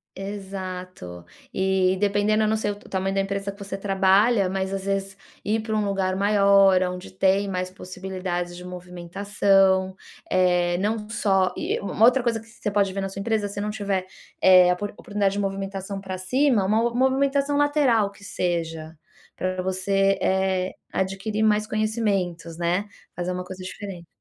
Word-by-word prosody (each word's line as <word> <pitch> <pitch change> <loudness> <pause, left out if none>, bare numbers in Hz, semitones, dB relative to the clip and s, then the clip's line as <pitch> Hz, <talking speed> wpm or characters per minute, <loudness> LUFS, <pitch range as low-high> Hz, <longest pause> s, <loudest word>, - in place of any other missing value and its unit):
Exato. 185 - -7 0.3
E, 190 -1 +2
dependendo, 205 +1 +2
eu - - +2
não 220 0 +1
sei 205 -1 -1
o - - -3
o - - -17
tamanho 195 0 -1
da 195 - +2
empresa 195 0 -3
que 200 - -16
você 195 0 -5
trabalha, 195 +1 +3
mas 190 0 -2
às 195 0 -4
vezes 195 -1 -2 0.3
ir 220 +2 +1
para 220 0 -3
um 210 -1 +1
lugar 190 -2 0
maior, 200 -2 +5
aonde 180 0 -5
tem 195 +1 +2
mais 185 -1 -2
possibilidades 185 -1 -5
de 180 - -9
movimentação. 190 +2 +1 0.3
Eh, 180 -1 +2
não 210 +1 -1
só 195 -4 +1
e - - -1
u - - -8
uma 220 - +1
outra 250 0 +4
coisa 230 -2 0
que 225 - -16
você 225 -2 -5
pode 200 -1 +2
ver 195 - -3
na 195 - -3
sua 195 - -7
empresa, 215 0 0
se 200 0 -6
não 210 - -2
tiver, 200 -3 -2 0.4
eh, 185 -1 +7
apor 200 +3 -1
oportunidade 200 -1 -1
de 205 - -2
movimentação 195 0 -3
pra 190 -1 -5
cima, 235 +2 +2
uma 215 +3 +2
mo 235 - -10
movimentação 275 +2 +2
lateral, 275 -8 +3
que 200 - -18
seja, 165 -4 -3 0.4
pra 185 0 -2
você, 195 +1 +1
eh, 190 -1 +1 0.2
adquirir 195 +3 -1
mais 215 0 +3
conhecimentos, 200 -7 -1
né, 175 +4 0 0.3
fazer 180 +1 -3
uma 180 0 -4
coisa 185 0 -9
diferente. 185 -3 -8
195 Hz, 175 wpm, -24 LUFS, 185-205 Hz, 0.4 s, eh